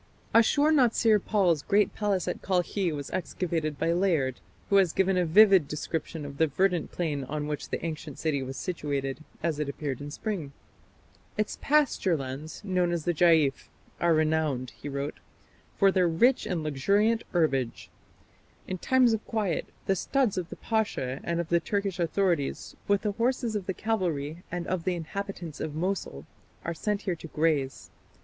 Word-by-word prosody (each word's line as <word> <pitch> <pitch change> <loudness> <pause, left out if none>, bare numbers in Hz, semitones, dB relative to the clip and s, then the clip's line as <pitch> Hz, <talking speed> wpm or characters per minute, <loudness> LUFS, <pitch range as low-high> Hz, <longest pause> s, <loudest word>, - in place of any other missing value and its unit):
Ashur 285 +7 +5
natsir 230 -7 +4
pal's 180 -8 +2
great 205 +3 +2
palace 205 -3 0
at - - -3
Kalkhi 185 0 0
was 145 -2 -5
excavated 165 -4 -2
by 165 +4 +1
Layard, 165 -9 +1 0.3
who 200 - +6
has 185 -4 +4
given 190 0 +2
a 180 -2 +2
vivid 190 -2 +6
description 155 +1 -4
of 140 -1 -8
the 160 - +4
verdant 180 +3 +1
plain 150 -5 -2
on 150 +2 -3
which 150 -1 -4
the - - -3
ancient 155 -3 -5
city 150 -4 0
was 135 0 -5
situated, 140 -1 -3 0.2
as 160 -3 0
it 150 -2 -1
appeared 140 -2 -4
in 145 - -6
spring. 160 -4 -4 0.8
"Its 215 0 -2
pasture 275 - +2
lands, 135 +6 -6
known 180 -3 +1
as 170 -3 -2
the 175 - +2
'Jaif', 160 -4 +3 0.3
are 170 -1 +3
renowned", 155 -5 +1
he 145 - -8
wrote, 140 +1 -4 0.6
"for 195 -1 +5
their 185 -2 +3
rich 235 +11 +3
and 175 -4 -2
luxuriant 200 +11 +2
herbage. 135 -8 0 0.8
In 185 -1 -4
times 255 0 +4
of 220 - -2
quiet, 210 -7 -1 0.2
the 195 - +2
studs 255 +3 +1
of 180 -2 -3
the - - -7
Pasha 205 - -1
and 170 0 -1
of 170 -1 -3
the 170 - +4
Turkish 195 +1 -2
authorities, 170 -3 0
with 200 -1 +2
the 210 - +1
horses 235 +1 0
of 200 -3 -3
the 190 - 0
cavalry 170 -8 -2
and 175 0 -3
of 185 -3 -2
the 185 0 0
inhabitants 175 -1 -6
of 150 -2 -4
Mosul, 160 - -3 0.4
are 165 - -1
sent 205 +5 -2
here 185 -4 -1
to 165 - -9
graze.... 150 -4 -1
170 Hz, 170 wpm, -28 LUFS, 150-200 Hz, 0.8 s, who